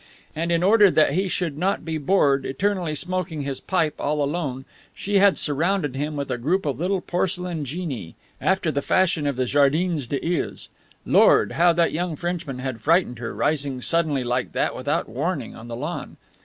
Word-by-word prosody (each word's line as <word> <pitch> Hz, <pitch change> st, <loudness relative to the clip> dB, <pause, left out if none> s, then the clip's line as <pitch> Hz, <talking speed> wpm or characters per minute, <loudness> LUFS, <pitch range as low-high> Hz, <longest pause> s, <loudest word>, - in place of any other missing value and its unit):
And 165 Hz, +2 st, -1 dB
in 170 Hz, 0 st, +2 dB
order 205 Hz, +1 st, +6 dB
that 155 Hz, -4 st, +3 dB
he 190 Hz, +4 st, +1 dB
should 165 Hz, -5 st, -2 dB
not 190 Hz, +3 st, 0 dB
be 160 Hz, -1 st, -2 dB
bored, 140 Hz, -4 st, +2 dB
eternally 180 Hz, +1 st, -1 dB
smoking 175 Hz, -2 st, -3 dB
his 135 Hz, -1 st, -4 dB
pipe 165 Hz, -5 st, 0 dB
all 150 Hz, 0 st, 0 dB
alone, 140 Hz, -4 st, -3 dB, 0.3 s
she 200 Hz, 0 st, +1 dB
had 200 Hz, 0 st, +5 dB
surrounded 155 Hz, 0 st, 0 dB
him 150 Hz, +2 st, -3 dB
with 140 Hz, -2 st, -3 dB
a 125 Hz, -, -2 dB
group 170 Hz, +10 st, 0 dB
of 140 Hz, -4 st, -2 dB
little 185 Hz, +2 st, 0 dB
porcelain 180 Hz, -3 st, -2 dB
genii, 135 Hz, -, -5 dB, 0.3 s
after 190 Hz, -3 st, +1 dB
the 140 Hz, -, -1 dB
fashion 170 Hz, -3 st, +1 dB
of 140 Hz, -, -1 dB
the 130 Hz, 0 st, 0 dB
Jardins 145 Hz, +2 st, +2 dB
des 140 Hz, +2 st, -3 dB, 0.2 s
Iles. -, -, -8 dB, 0.4 s
Lord! -, -, +5 dB
how 175 Hz, +1 st, +4 dB
that 170 Hz, 0 st, +2 dB
young 170 Hz, 0 st, -2 dB
Frenchman 170 Hz, -5 st, -4 dB
had 130 Hz, -3 st, -5 dB
frightened 160 Hz, -, +2 dB
her, 115 Hz, -1 st, -5 dB
rising 140 Hz, -4 st, -1 dB
suddenly 155 Hz, -1 st, +1 dB
like 125 Hz, +1 st, -2 dB
that, -, -, 0 dB
without -, -, -1 dB
warning, 140 Hz, +2 st, -3 dB
on 115 Hz, -, -10 dB
the 120 Hz, -, -5 dB
lawn. 150 Hz, +8 st, -5 dB
155 Hz, 185 wpm, -23 LUFS, 140-180 Hz, 0.4 s, order